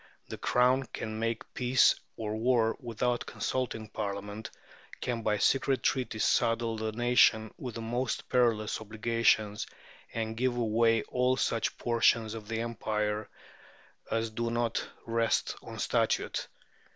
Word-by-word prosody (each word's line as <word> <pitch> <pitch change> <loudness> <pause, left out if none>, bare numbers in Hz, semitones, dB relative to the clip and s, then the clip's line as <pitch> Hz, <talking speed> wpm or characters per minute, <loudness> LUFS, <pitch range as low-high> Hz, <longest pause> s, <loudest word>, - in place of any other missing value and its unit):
" - - -40
The - - -4
Crown 125 +2 +3
can 110 0 -4
make 115 0 -3
peace 125 0 +4 0.2
or 110 -2 -3
war 115 0 +2
without 120 -1 -1
consulting 120 -4 -2
Parliament, 105 0 -5 0.5
can 120 -2 -2
by 105 -1 +1
secret 135 +4 +2
treaty 125 -4 0
saddle 115 +1 +2
the 110 0 -2
nation 115 -2 +3
with 125 -4 -7
the 115 - -4
most 120 +1 -2
perilous 115 -4 +1
obligations, 110 -1 +1 0.4
and 110 -1 -3
give 125 +1 0
away 115 -1 +3
all 125 +1 +1
such 115 -2 0
portions 115 -2 +2
of 110 -2 -8
the 115 0 -2
empire 105 -2 -2 0.8
as 115 0 -1
do 115 +1 -2
not 120 0 -1 0.2
rest 115 0 +1
on - - -9
Statute. - - 0
115 Hz, 135 wpm, -30 LUFS, 110-120 Hz, 0.8 s, peace